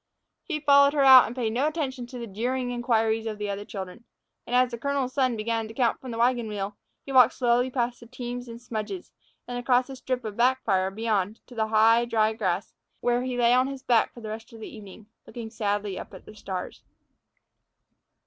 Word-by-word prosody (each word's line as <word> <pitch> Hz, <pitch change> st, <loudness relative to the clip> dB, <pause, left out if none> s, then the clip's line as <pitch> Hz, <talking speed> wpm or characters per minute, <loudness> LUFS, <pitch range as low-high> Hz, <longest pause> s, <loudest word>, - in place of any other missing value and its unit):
He 320 Hz, -5 st, -4 dB
followed 280 Hz, -1 st, +5 dB
her 285 Hz, -2 st, +2 dB
out 260 Hz, -2 st, +9 dB
and 235 Hz, -, -7 dB
paid 230 Hz, -4 st, -1 dB
no 265 Hz, +5 st, +1 dB
attention 275 Hz, -6 st, -3 dB
to 250 Hz, -, -9 dB
the 235 Hz, -, -5 dB
jeering 245 Hz, +4 st, -2 dB
inquiries 225 Hz, -2 st, 0 dB
of 215 Hz, -1 st, -4 dB
the 205 Hz, -1 st, -3 dB
other 200 Hz, +1 st, -4 dB
children. 195 Hz, +2 st, -8 dB, 0.4 s
And 245 Hz, -, -1 dB
as 250 Hz, 0 st, +4 dB
the 235 Hz, -, -6 dB
colonel's 275 Hz, -1 st, -1 dB
son 260 Hz, -4 st, +1 dB
began 225 Hz, +1 st, -2 dB
to 225 Hz, -, -11 dB
count 240 Hz, -3 st, +1 dB
from 260 Hz, -, -8 dB
the 230 Hz, -, -5 dB
wagon 240 Hz, -1 st, +2 dB
wheel 205 Hz, -1 st, -4 dB, 0.3 s
he 275 Hz, -, -7 dB
walked 255 Hz, -2 st, +6 dB
slowly 245 Hz, 0 st, +2 dB
past 245 Hz, -1 st, -2 dB
the 235 Hz, -, -14 dB
teams 245 Hz, +1 st, -6 dB
and 230 Hz, 0 st, -9 dB
smudges, 240 Hz, -, -6 dB, 0.4 s
and 245 Hz, 0 st, -4 dB
across 250 Hz, +1 st, +2 dB
a -, -, -7 dB
strip 255 Hz, -1 st, -3 dB
of 210 Hz, -2 st, -5 dB
backfire 235 Hz, -6 st, +2 dB
beyond, 210 Hz, 0 st, -1 dB
to 250 Hz, -, -14 dB
the 220 Hz, -2 st, -1 dB
high, 225 Hz, +2 st, +4 dB
dry 220 Hz, -2 st, +1 dB
grass, 220 Hz, -, -2 dB, 0.3 s
where 245 Hz, 0 st, +1 dB
he 255 Hz, -1 st, -3 dB
lay 240 Hz, 0 st, +4 dB
on 255 Hz, +1 st, +3 dB
his 275 Hz, -1 st, -7 dB
back 235 Hz, -2 st, +3 dB
for 240 Hz, -, -13 dB
the 220 Hz, -, -6 dB
rest 220 Hz, +1 st, -7 dB
of 225 Hz, -, -11 dB
the 220 Hz, -, -9 dB
evening, 210 Hz, 0 st, -12 dB, 0.2 s
looking 230 Hz, -2 st, -8 dB
sadly 205 Hz, -3 st, -2 dB
up -, -, -10 dB
at -, -, -13 dB
the -, -, -12 dB
stars. 190 Hz, -3 st, -6 dB
235 Hz, 215 wpm, -26 LUFS, 220-255 Hz, 0.4 s, out